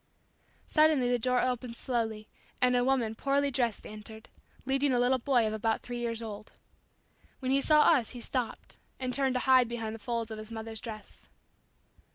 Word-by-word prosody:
Suddenly 305 -5 +4
the 245 - +2
door 250 +1 +2
opened 250 -1 -2
slowly 225 -4 -2 0.3
and 250 0 +3
a 245 - +3
woman 250 -4 +1
poorly 280 +4 0
dressed 240 -4 0
entered, 220 +1 -10 0.4
leading 270 +1 +1
a 245 - +2
little 255 +1 +3
boy 245 -2 +2
of 215 - -1
about 220 +1 -1
three 245 0 -5
years 230 -1 -2
old. 215 -1 -8 0.8
When 260 -1 -2
he 275 +1 +3
saw 300 +1 +5
us 275 -8 +4
he 245 - -7
stopped 245 -1 -4 0.2
and 255 -1 -2
turned 265 -1 +1
to 250 - +1
hide 260 -2 +5
behind 225 -2 -4
the 225 - -8
folds 230 0 -3
of 220 - -5
his 215 0 -9
mother's 225 -1 -4
dress. 215 -3 -9
245 Hz, 185 wpm, -30 LUFS, 225-260 Hz, 0.8 s, saw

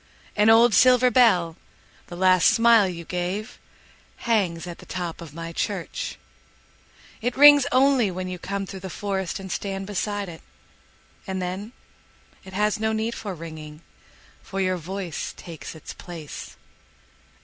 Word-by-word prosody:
An 210 +1 +4
old 230 +1 +6
silver 250 +3 +5
bell, 180 -10 +4 0.5
the 175 - -8
last 185 -1 +4
smile 230 -3 +5
you 170 -1 -7
gave, 185 +6 -4 0.7
Hangs 190 -8 +1
at 175 -1 -8
the - - -13
top 175 -2 -5
of 160 -3 -10
my 165 0 -6
church.It 245 +7 -7
rings 290 -1 +8
only 260 -4 +4
when 185 0 -5
you 180 -1 -6
come 195 +2 -3
through 190 0 -8
the 190 0 -7
forestAnd 190 -1 -4
stand 195 -1 -3
beside 205 0 -3
it. 165 -2 -10 0.9
And 190 -1 -3
then, 185 +5 -5 0.7
it 190 - -12
has 210 +2 +1
no 220 0 0
need 220 +1 -1
for 200 -5 -6
ringing, 155 -1 -9 0.6
For 195 - -6
your 185 -1 +1
voice 180 0 -5
takes 165 -2 -9
its 160 - -9
place. 165 -4 -9
190 Hz, 140 wpm, -24 LUFS, 175-220 Hz, 0.9 s, rings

